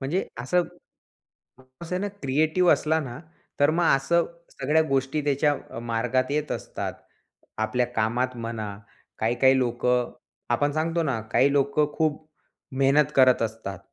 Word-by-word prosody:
म्हणजे 150 +8 -1
असं 175 +9 +1 1.2
असं 180 +2 -3
ना 205 - -1
क्रिएटिव्ह 155 +6 +3
असला 160 +1 +1
ना, 125 -4 -7 0.4
तर 145 +1 +5
मग 170 +2 +1
असं 170 +5 +1 0.2
सगळ्या 150 +4 +1
गोष्टी 135 +2 0
त्याच्या 145 +1 +2 0.2
अ, - - -7
मार्गात 120 +3 -1
येत 150 +1 -1
असतात. - - -4 0.7
आपल्या 110 +3 0
कामात 125 +4 0
म्हणा, 110 -3 -5 0.4
काही-काही 125 +4 +3
लोकं 125 0 0 0.4
आपण 145 0 +1
सांगतो 165 +2 0
ना, 130 -7 -1
काही 140 +6 +3
लोकं 145 +1 +1
खूप 155 -1 -1 0.5
मेहनत 145 +2 +3
करत 130 -3 +5
असतात. 110 -4 -4
135 Hz, 135 wpm, -25 LUFS, 120-155 Hz, 1.2 s, तर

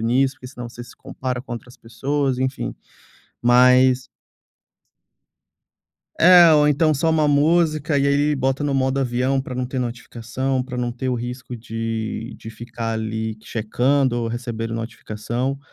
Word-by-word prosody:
nisso, 130 +4 +2
porque 125 - -12
senão 125 -3 -8
você 120 +1 -9
se 120 - -14
compara 125 -1 -5
com 125 - -9
outras 120 +1 -8
pessoas, 135 +3 -2
enfim, 130 +1 -2 0.7
mas 125 +1 +5 2.1
É, 175 -1 +8
ou 150 -1 +5
então, 155 +2 +3
só 160 +4 +1
uma 155 -1 +2
música. 155 0 +2
E 140 - +2
aí 140 - +3
aí, 145 +1 +2
bota 135 +1 0
no 145 - 0
modo 130 0 +1
avião 130 +1 0
para 130 -1 -7
não 125 0 -2
ter 130 +1 -4
notificação, 125 +2 -3
para 125 -1 -7
não 120 -1 -1
ter 130 +2 -4
o 125 - +1
risco 125 +1 -6
de 115 0 -4
de 110 - -9
ficar 115 0 -5
ali 110 0 -3
checando 125 +3 0
ou 115 - -2
recebendo 115 -1 -4
notificação. 115 +3 -4
125 Hz, 155 wpm, -21 LUFS, 115-135 Hz, 2.1 s, É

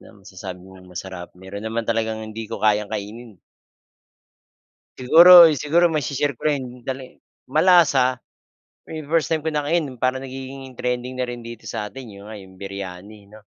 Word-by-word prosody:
Masasabi 95 -3 -11
mong 95 -1 -15
masarap. 90 0 -7
Meron 95 +2 -8
naman 115 +1 -2
talagang 110 -1 -1
hindi 110 0 -7
ko - - -3
kayang 105 -1 +2
kainin. 110 +2 -7 1.6
Siguro 170 +5 +9
siguro 170 +3 +3
maisi-share 145 -3 -2
ko - - -1
rin 130 -4 -2
tali 130 -1 -6 0.3
malasa, 155 -6 +4 0.8
eh, 155 -2 -6
first 160 +1 0
time 160 - +2
ko 160 - -1
nakain 150 +2 0
parang 130 +2 -1
nagiging 135 0 -9
trending 125 +1 -3
na 130 - -3
rin 120 -1 -8
dito 115 -1 -9
sa 110 -3 -5
atin, 125 +1 -10
'yon 100 0 -12
nga 110 - -9
'yong, 95 -2 -13
Biryani, 100 +1 -9
'no. 110 0 -15
120 Hz, 155 wpm, -22 LUFS, 105-140 Hz, 1.6 s, Siguro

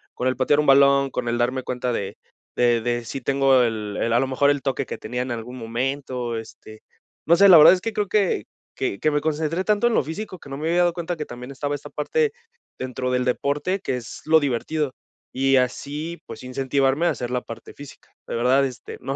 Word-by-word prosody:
con 125 - -1
el 130 - +1
patear 145 +3 +2
un 150 - +2
balón, 140 0 +5
con 120 - -3
el 120 - 0
darme 125 +2 0
cuenta 125 0 -2
de 100 -3 -4 0.4
de 120 -1 +3
de 120 0 -2
si 135 +3 -5
tengo 135 0 +3
el 110 -3 -2
el 115 - 0
a 120 - +4
lo - - +1
mejor 135 +2 +2
el 145 -1 0
toque 135 -3 -2
que - - -5
tenía 125 +3 -4
en 125 - -4
algún 120 +2 -6
momento, 125 +1 -3
este, 110 -1 -12 0.5
no 170 - +6
sé, 200 +2 +6
la 180 - +10
verdad 150 - +9
es 180 - -1
que 225 +2 -3
creo 210 -1 -1
que 205 -4 +1 0.3
que 100 - -2
que 155 - +1
me 145 0 0
concentré 160 +3 -1
tanto 210 +3 +1
en 240 - +3
lo - - +2
físico, 185 +5 -6
que 140 - -13
no 135 - -5
me 155 +2 -3
había 175 +1 +2
dado 175 -1 +3
cuenta 175 0 -3
que 155 -2 -5
también 125 +2 -9
estaba 145 +1 -3
esta 145 - -10
parte 465 -2 0 0.5
dentro 125 0 -3
del 125 0 +1
deporte, 145 +9 -1
que 130 -10 -2
es 115 -4 -9
lo 160 +1 +5
divertido. 145 +1 -2 0.4
Y 135 0 +3
así 145 +6 -2
pues, - - -9
incentivarme 135 +4 0
a - - +4
hacer 120 - -4
la 125 0 -1
parte 115 -1 -10
física, 145 -1 -13 0.2
de - - -4
verdad, 130 +4 +3
este, 130 -2 -7
no 135 +1 -3
135 Hz, 230 wpm, -23 LUFS, 125-155 Hz, 0.5 s, la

